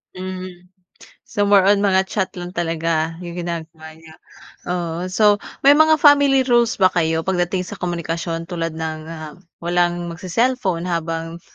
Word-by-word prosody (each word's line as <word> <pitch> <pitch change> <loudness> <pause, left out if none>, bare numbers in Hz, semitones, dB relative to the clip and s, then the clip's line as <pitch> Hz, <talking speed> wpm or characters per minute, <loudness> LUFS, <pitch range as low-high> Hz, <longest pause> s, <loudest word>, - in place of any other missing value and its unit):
Hmm. 185 -1 -8 0.6
So, 205 - 0
more 200 -1 +5
on 200 +2 +4
mga 190 -1 +2
chat 190 -3 -1
lang 175 - -6
talaga 165 -1 -1
yung 175 0 -7
ginagawa 165 -2 -6
niyo? 160 0 -16 0.6
Oo. 175 0 -3
So, 205 +2 +3 0.2
may 280 - +8
mga 315 +1 +5
family 285 -3 +5
rules 240 -2 +2
ba 185 -2 +3
kayo 160 -1 0
pagdating 180 0 -1
sa - - -9
komunikasyon 165 -1 -3
tulad 165 -2 -4
ng, 160 -1 -4
ah, 155 -2 -8 0.3
walang 175 0 +1
magse-selpon 185 0 -1
habang 165 -1 -3
175 Hz, 145 wpm, -20 LUFS, 165-190 Hz, 0.6 s, may